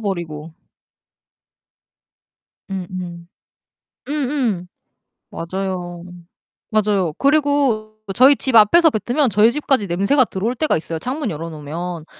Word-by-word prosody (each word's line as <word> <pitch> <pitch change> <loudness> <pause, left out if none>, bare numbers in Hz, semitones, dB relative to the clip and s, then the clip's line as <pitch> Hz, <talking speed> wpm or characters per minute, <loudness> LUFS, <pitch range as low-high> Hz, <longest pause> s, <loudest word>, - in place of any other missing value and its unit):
버리고. 165 -6 -5 2.2
음 190 -2 -4
음. 175 -2 -7 0.8
음 - - -2 0.2
음. 225 -11 -1 0.6
맞아요. 175 0 -5 0.7
맞아요. 200 -6 +1
그리고 275 -7 +1 0.2
저희 265 +5 +7
집 260 -2 -1
앞에서 275 +11 +7
뱉으면 250 +3 0
저희 215 +3 +4
집까지 270 -7 0
냄새가 200 +10 +2
들어올 220 +5 -3
때가 310 +5 +1
있어요 165 +1 -5
창문 260 - -3
열어 165 0 -5
놓으면. 160 +2 -6
200 Hz, 235 characters per minute, -20 LUFS, 175-255 Hz, 2.2 s, 저희